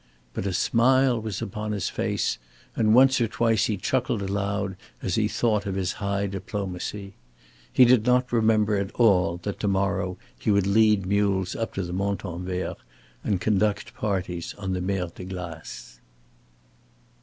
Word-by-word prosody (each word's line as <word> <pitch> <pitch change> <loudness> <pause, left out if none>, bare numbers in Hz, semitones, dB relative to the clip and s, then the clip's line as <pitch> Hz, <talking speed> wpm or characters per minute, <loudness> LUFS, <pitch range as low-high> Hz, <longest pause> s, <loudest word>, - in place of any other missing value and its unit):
But 100 - -3
a - - 0
smile 125 +4 +3
was 110 -3 -4
upon 105 +2 -4
his 100 -3 -2
face, 105 -3 -1 0.4
and 110 -1 +3
once 130 0 +6
or 115 - +3
twice 115 0 +2
he 105 - -1
chuckled 120 +1 -1
aloud 100 0 -2 0.2
as 95 - -3
he 110 +2 +2
thought 105 -2 0
of 95 - -2
his 95 -2 -1
high 100 0 0
diplomacy. 100 0 -5 0.6
He 125 - +7
did 120 -2 +5
not 125 +1 +2
remember 110 -2 +3
at 100 -1 -2
all 90 -7 +3
that 100 - -4
to 105 - -1
morrow 95 -1 0 0.2
he - - -2
would 100 -2 +3
lead 105 -1 +4
mules 100 -2 +1
up 115 -3 -4
to 95 - -1
the 90 0 -5
Montanvert 90 -2 -3 0.5
and 100 -3 0
conduct 105 +1 0
parties 90 -5 -3
on 95 -2 -3
the 90 - -2
Mer 95 0 -1
de - - -9
Glace. 85 -9 -8
100 Hz, 160 wpm, -25 LUFS, 95-110 Hz, 0.6 s, He